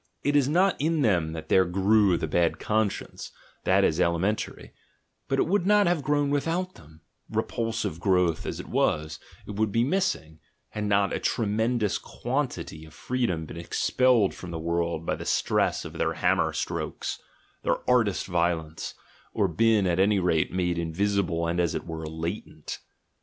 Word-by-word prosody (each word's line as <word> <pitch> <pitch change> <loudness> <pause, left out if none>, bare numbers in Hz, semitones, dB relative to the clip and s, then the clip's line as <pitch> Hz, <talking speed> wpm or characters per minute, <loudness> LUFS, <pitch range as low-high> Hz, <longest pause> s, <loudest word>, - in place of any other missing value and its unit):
It 145 +1 +1
is 140 -2 +4
not 180 0 +2
in 160 0 +1
them 85 -8 +2
that 80 -1 -7
there 95 - +5
grew 95 +1 +3
the - - -2
bad 85 +2 +1
conscience, 110 -1 -2 0.3
that - - +4
is 80 +3 +2
elementary 90 +6 -1 0.5
—but 135 - 0
it - - +3
would 190 0 +1
not 210 0 +5
have 175 -3 +1
grown 145 0 +1
without 170 +6 -1
than, 80 +1 -17 0.3
repulsive 115 -8 -2
growth 90 -3 +1
as - - -4
it - - -7
was, 80 0 0 0.3
it 105 - -7
would 110 -1 +1
be 115 +3 +2
missing, 135 - -1 0.3
had 105 0 -4
not 100 -1 +2
a - - -1
tremendous 110 0 0
quantity 120 - -4
of 80 0 -14
freedom 120 -11 -1
been 85 - -9
expelled 115 +5 +2
from 90 - -9
the 85 - -4
world 85 0 -1
by - - 0
the - - -5
stress - - +1
of - - -7
their - - 0
hammer - - +2
strokes, - - -4 0.4
their - - -1
artist 115 -6 +2
violence, 85 -3 -1 0.4
or 100 -3 +2
been 105 +4 +3
at 90 -1 +1
any 100 +2 +4
rate 85 -4 +1
made 90 -2 0
invisible 85 0 0
and, 85 +1 -1
as 85 -3 +1
it - - -4
were, 80 -1 -5
latent. 80 +2 -5
95 Hz, 170 wpm, -27 LUFS, 85-120 Hz, 0.5 s, there